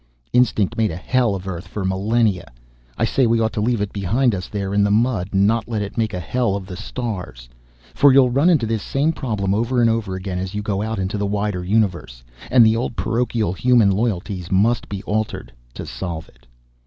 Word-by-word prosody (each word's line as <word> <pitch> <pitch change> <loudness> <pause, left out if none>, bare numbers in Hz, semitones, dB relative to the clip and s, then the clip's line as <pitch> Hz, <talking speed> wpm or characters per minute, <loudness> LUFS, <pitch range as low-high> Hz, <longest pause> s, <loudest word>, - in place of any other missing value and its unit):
Instinct 110 -5 +2
made 110 -1 +2
a 80 - -5
hell 115 +4 +1
of 95 0 -7
Earth 90 -2 -5
for 100 -3 -4
millennia 100 +1 0 0.5
I - - +1
say 130 -3 +2
we 115 0 +2
ought 110 0 0
to 105 - -2
leave 115 0 0
it 105 - -3
behind 115 +6 +1
us 90 -2 -4
there 100 -1 -4
in 100 0 +3
the 100 - +2
mud 105 -3 +1
and 100 0 +3
not 115 +2 +1
let 110 -3 -2
it 100 - -7
make 110 -3 0
a - - -3
hell 115 +4 -1
of 100 -2 -5
the 95 -1 -8
stars. 90 - -6 0.5
For 140 - +5
you'll 130 -2 +5
run 140 +8 +3
into 155 -10 +3
this 110 -1 -1
same 145 +4 0
problem 105 -9 -2
over 120 +4 0
and 115 -1 +4
over 110 -4 -2
again 95 -1 -4
as 95 +2 -5
you 105 - -3
go 100 -1 -1
out 110 +1 -3
into 95 +2 -2
the 100 - 0
wider 100 -2 -2
universe, 90 - -1 0.3
and 125 -2 +6
the 110 0 +4
old 120 +1 -2
parochial 115 -5 -1
human 120 -1 +4
loyalties 95 -4 -2
must 110 +5 +2
be 100 0 -5
altered, 110 - -3 0.2
to - - -6
solve 85 -3 -6
it." - - -26
105 Hz, 220 wpm, -21 LUFS, 95-115 Hz, 0.5 s, and